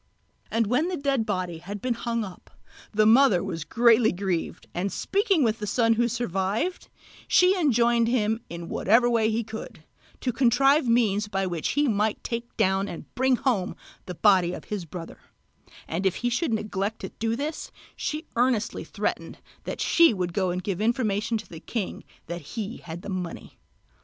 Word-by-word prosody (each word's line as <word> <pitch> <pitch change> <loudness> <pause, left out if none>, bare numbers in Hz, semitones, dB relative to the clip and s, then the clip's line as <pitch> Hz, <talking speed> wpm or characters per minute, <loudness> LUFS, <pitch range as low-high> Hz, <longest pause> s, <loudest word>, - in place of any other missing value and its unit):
And 230 0 +1
when 250 +10 +1
the 365 -1 -2
dead 275 -5 0
body 180 -5 -2
had 200 +4 -7
been 250 +4 0
hung 235 0 -2
up, 190 -3 -10 0.4
the 215 0 +3
mother 225 -5 +5
was 170 -5 -4
greatly 230 +5 +4
grieved, 180 -2 -3
and 190 +3 -2
speaking 390 -5 +1
with 225 -1 +1
the 210 - -4
son 230 +2 +3
who 235 +1 +2
survived 225 - -2 0.4
she 365 +1 +5
enjoined 240 - +3
him, 225 -2 +1
in 170 0 -7
whatever 230 +8 +3
way 230 -2 +2
he 225 +1 0
could, 220 0 -8 0.4
to 250 - -1
contrive 270 +4 +4
means 215 -3 +2
by 195 -2 -1
which 175 -4 -2
he 290 0 +2
might 215 -1 0
take 235 0 -5
down 190 +1 +2
and 170 - -9
bring 260 +1 +3
home 230 -8 0 0.3
the 180 - -5
body 185 -3 +4
of - - -7
his 205 -5 -4
brother; 165 +1 -9 0.7
and 170 +4 -2
if 190 - 0
he 245 - +2
should 240 +4 0
neglect 210 -1 -2
to - - -5
do 225 0 0
this, 295 +5 -4 0.2
she 310 +2 -3
earnestly 235 -2 +1
threatened - - -3 0.3
that - - -5
she 335 -9 +5
would 180 -2 -2
go 190 -1 +1
and 180 +1 -3
give 195 0 -2
information 225 -1 +1
to - - -9
the 165 - -10
king 215 +1 -4 0.2
that 170 +1 -5 0.2
he 220 +1 -3
had 170 +1 -9
the - - -8
money. 180 -3 -6
220 Hz, 180 wpm, -26 LUFS, 190-240 Hz, 0.7 s, mother